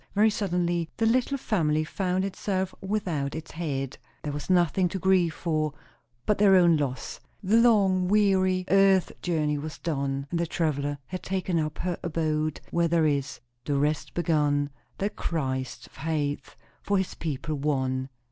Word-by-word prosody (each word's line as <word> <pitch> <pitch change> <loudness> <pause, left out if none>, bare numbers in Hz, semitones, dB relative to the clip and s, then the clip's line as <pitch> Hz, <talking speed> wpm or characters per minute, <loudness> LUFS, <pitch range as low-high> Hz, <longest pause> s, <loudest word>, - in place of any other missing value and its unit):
Very 215 +2 +5
suddenly 175 -4 -1
the 225 - +1
little 255 +4 +2
family 155 - +1
found 185 +3 -1
itself 190 -1 -2
without 180 -9 -2
its 160 0 -7
head. 140 -5 -3 0.2
There 150 - -3
was 145 +4 -6
nothing 180 0 +3
to 190 - -3
grieve 185 -3 +2
for, 155 -3 -1 0.5
but 210 - +1
their 200 -2 +6
own 175 -3 +6
loss. 135 -4 -3 0.2
The 205 +4 +4
long, 195 -6 +4
weary 190 -2 +3
earth 195 -1 +4
journey 150 -4 0
was 155 +1 -6
done, 140 -4 -2
and 170 - 0
the 170 - 0
traveller 145 -3 -1
had 185 +6 -6
taken 185 -2 -1
up 155 -1 -2
her 180 -1 -2
abode 155 -2 -1
where 170 0 +2
there 165 -1 +2
is 140 -3 -1 0.2
"The 145 - 0
rest 150 +2 -1
begun, 150 -4 +1 0.3
That 205 +2 -2
Christ 130 -5 -3
hath 145 -2 -3 0.3
for 200 - +1
his 190 -1 -1
people 155 0 -4
won." 135 -3 -1
165 Hz, 155 wpm, -27 LUFS, 150-190 Hz, 0.5 s, their